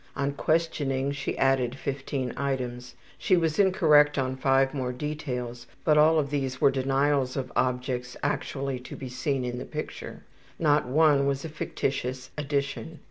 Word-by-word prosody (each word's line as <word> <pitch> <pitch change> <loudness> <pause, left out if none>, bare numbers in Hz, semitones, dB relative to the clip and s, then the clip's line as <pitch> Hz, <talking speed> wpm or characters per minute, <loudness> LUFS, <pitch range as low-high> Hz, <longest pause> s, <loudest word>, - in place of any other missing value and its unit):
On 140 0 0
questioning 140 -4 0
she 140 0 -3
added 135 -2 +2
15 135 -2 -3
items. 125 -3 -3 0.2
She 185 -3 +3
was 160 -1 0
incorrect 150 -7 +5
on 130 -1 0
5 135 +1 +2
more 130 -3 -2
details, 125 -3 -5 0.2
but 155 - +4
all 155 +2 +5
of 145 -2 0
these 135 -3 -2
were 140 - +5
denials 135 0 +1
of 130 -2 -3
objects 125 0 -1
actually 140 -2 -2
to 125 - -9
be 130 - -7
seen 135 0 -1
in 125 0 -3
the - - -4
picture. - - -7 0.3
Not 150 -4 +2
one 145 0 +4
was 140 +1 -1
a - - -4
fictitious 130 -3 -3
addition. 145 +2 -3
135 Hz, 155 wpm, -27 LUFS, 130-145 Hz, 0.3 s, incorrect